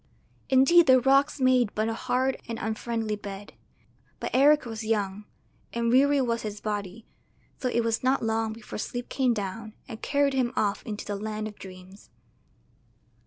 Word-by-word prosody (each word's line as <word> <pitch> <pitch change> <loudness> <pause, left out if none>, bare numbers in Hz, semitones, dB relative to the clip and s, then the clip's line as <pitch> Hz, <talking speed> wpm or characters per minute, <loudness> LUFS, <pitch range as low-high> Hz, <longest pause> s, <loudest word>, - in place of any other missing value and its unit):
Indeed 270 +6 +6
the 260 -1 +7
rocks 275 +3 +3
made 255 -4 +3
but 215 +1 0
a 225 - -1
hard 255 +3 -1
and 230 -1 -4
unfriendly 220 0 -2
bed, 205 0 -9 0.7
but - - -4
Eric 290 +3 +5
was 225 -1 -6
young, 210 -2 -2 0.5
and 235 0 0
weary 280 +3 +4
was 235 -2 -1
his 210 -1 -6
body, 205 0 -5 0.5
so 255 - -1
it 235 -1 +1
was 225 +1 -1
not 260 -1 +2
long 225 0 0
before 220 -1 -8
sleep 245 +2 -5
came 255 -3 +1
down 215 +2 -5
and 225 -3 -9
carried 285 -1 +1
him 255 -2 0
off 205 -3 0
into 210 -2 -5
the 205 - -3
land 215 +1 -4
of 210 - -11
dreams. 185 +1 -12
225 Hz, 165 wpm, -27 LUFS, 210-255 Hz, 0.7 s, the